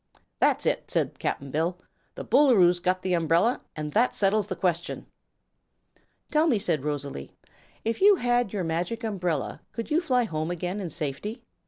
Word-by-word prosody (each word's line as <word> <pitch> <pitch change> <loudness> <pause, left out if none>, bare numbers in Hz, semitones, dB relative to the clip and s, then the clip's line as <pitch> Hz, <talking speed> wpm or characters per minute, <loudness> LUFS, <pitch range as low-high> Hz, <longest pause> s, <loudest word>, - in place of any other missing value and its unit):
"That's - - +2
it," - - 0
said - - -1
Cap'n 140 -1 -3
Bill; 165 +5 0 0.4
"the - - -7
Boolooroo's 220 -10 +5
got 185 +1 0
the 185 - 0
umbrel, 170 +7 +2 0.2
an' 150 -1 -4
that 235 +8 +2
settles 205 0 +2
the 190 - -3
question." 170 -1 -2 1.3
"Tell 310 +2 +3
me," 250 -8 +3
said 165 -8 -1
Rosalie; 145 - -4 0.5
"if 225 +7 -1
you 405 +1 +7
had 245 - +1
your 200 -3 -2
Magic 175 +8 -2
Umbrella, 180 - -2
could 230 +5 -5
you 320 +3 +3
fly 255 -7 +2
home 155 -6 -3
again 180 +3 -3
in 185 -4 -4
safety?" 170 - -4
185 Hz, 165 wpm, -26 LUFS, 165-230 Hz, 1.3 s, you